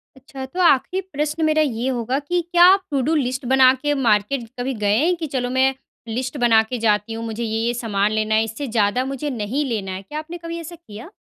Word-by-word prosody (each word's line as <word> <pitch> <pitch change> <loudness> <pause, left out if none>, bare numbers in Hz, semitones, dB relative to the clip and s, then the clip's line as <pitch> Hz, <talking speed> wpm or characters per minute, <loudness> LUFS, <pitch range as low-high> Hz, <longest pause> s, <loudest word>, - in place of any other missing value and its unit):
अच्छा, 265 0 -9
तो 355 +8 -8
आखिरी 350 +4 +3
प्रश्न 300 +2 -1
मेरा 310 0 +3
ये 250 -3 -1
होगा 250 +1 -1
कि 350 +5 -1
क्या 345 0 +6
आप 390 -1 0
टू 275 -2 +1
डू 325 - +2
लिस्ट 260 -2 -1
बना 260 0 +6
के 295 0 +1
मार्केट 235 -1 +1
कभी 260 +2 -2
गए 210 -2 +1
हैं, 340 +6 +2
कि 330 -2 -5
चलो 255 -3 -2
मैं 260 +1 +2 0.3
लिस्ट 255 +5 -4
बना 230 -3 +4
के 245 +3 -5
जाती 210 +1 +1
हूँ, 225 0 -5
मुझे 225 +1 -4
ये-ये 225 +2 -1
सामान 210 -3 0
लेना 215 0 0
है, 220 - +3
इससे 225 +6 -5
ज़्यादा 225 +3 +1
मुझे 275 +2 -4
नहीं 250 +4 -2
लेना 210 -7 -3
है? 185 +1 -5
क्या 295 +10 -6
आपने 335 +3 -8
कभी 335 0 -5
ऐसा 335 +1 -8
किया? 240 - -12
255 Hz, 230 wpm, -21 LUFS, 225-295 Hz, 0.3 s, क्या